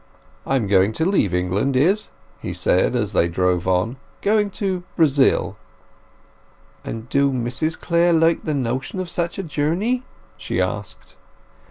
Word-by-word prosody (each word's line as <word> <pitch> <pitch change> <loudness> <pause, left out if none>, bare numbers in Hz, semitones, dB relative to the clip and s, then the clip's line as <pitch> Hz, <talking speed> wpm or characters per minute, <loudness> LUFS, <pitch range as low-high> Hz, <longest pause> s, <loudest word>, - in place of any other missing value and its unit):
"I 135 - +1
am 125 -5 +1
going 100 +1 +3
to 160 - -1
leave 185 - +2
England, 95 +9 0
Izz," 185 +11 +2 0.3
he - - -4
said, 95 +7 +2
as 105 -4 -1
they 85 - +3
drove 90 0 0
on. 95 +7 +1 0.3
"Going 210 0 +2
to 190 -3 -1
Brazil." 145 -5 +3 1.3
"And 115 +1 -6
do 140 +1 +2
Mrs 130 +6 -2
Clare 170 0 +2
like 165 0 +3
the 155 - -1
notion 130 +7 -2
of 185 -2 -4
such 170 -1 -2
a 195 - -3
journey?" 175 - -1 0.3
she - - -3
asked. - - -4
140 Hz, 150 wpm, -21 LUFS, 105-170 Hz, 1.3 s, going